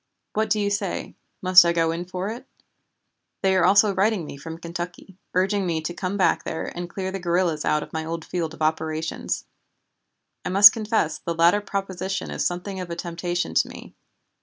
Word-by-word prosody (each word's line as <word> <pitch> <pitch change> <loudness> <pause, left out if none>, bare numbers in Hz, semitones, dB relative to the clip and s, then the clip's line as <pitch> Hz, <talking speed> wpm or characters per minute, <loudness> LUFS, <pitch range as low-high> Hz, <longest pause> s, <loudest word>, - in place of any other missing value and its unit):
What 220 +1 0
do 210 +1 +2
you 205 0 0
say, 200 -2 -3 0.3
must 185 -1 +8
I 170 0 +2
go 165 -1 +2
in 170 +2 -4
for 185 +2 -4
it? 245 +4 -8 1.0
They 190 0 +3
are 185 - +3
also 200 +1 +5
writing 195 -2 +1
me - - -8
from 160 +4 -8
Kentucky 175 +2 -7 0.2
urging 195 +2 +2
me 165 -2 0
to 165 +2 -4
come 185 +3 -3
back 190 - +2
there 160 - -5
and 175 0 -5
clear 190 +1 -4
the 195 - -4
guerrillas 175 -3 0
out 150 - +1
of - - -13
my 160 0 -2
old 165 0 -5
field 165 -3 -3
of 155 - -5
operations. 160 0 -2 1.0
I - - -3
must 200 +2 +9
confess 210 -9 -1
the 170 +1 -4
latter 170 +5 +4
proposition 195 -1 -4
is - - -2
something 185 +2 -3
of 180 -1 -6
a 170 - -4
temptation 175 - -3
to - - +3
me. - - -11
180 Hz, 195 wpm, -24 LUFS, 165-195 Hz, 1.0 s, must